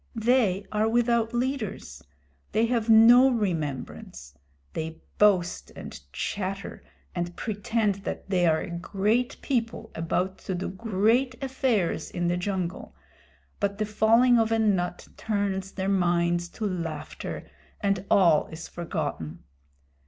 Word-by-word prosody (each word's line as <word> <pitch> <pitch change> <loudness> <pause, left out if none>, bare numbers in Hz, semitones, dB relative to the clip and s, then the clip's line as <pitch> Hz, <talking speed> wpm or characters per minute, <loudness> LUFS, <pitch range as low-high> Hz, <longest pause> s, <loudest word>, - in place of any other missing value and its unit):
They 220 -4 +2
are 215 +1 +1
without 235 -1 +2
leaders. 240 - -3 0.5
They 220 +2 +3
have 230 -1 0
no 235 +4 +8
remembrance. 155 - -3 0.4
They 160 0 -4 0.2
boast 190 -4 +3
and - - -8
chatter 195 - -4 0.3
and 175 0 -3
pretend 210 -1 -1
that - - -5
they 180 -3 +2
are 160 -1 +3
a - - -6
great 210 +8 0
people 230 -4 -2
about 180 +3 -1
to 190 - -4
do 180 - -3
great 225 +6 +1
affairs 250 - 0
in 175 -1 -1
the 175 - +1
jungle, 185 -1 -3 0.6
but 200 0 -1
the 215 - 0
falling 230 +3 +4
of 225 0 +1
a 225 - +3
nut 190 -5 0
turns 200 -3 -2
their 190 -1 -3
minds 175 -2 +1
to 220 - -2
laughter 165 -6 -5 0.3
and 195 -3 0
all 170 -6 +5
is 160 +1 -8
forgotten. 145 - -4
200 Hz, 130 wpm, -27 LUFS, 175-225 Hz, 0.6 s, no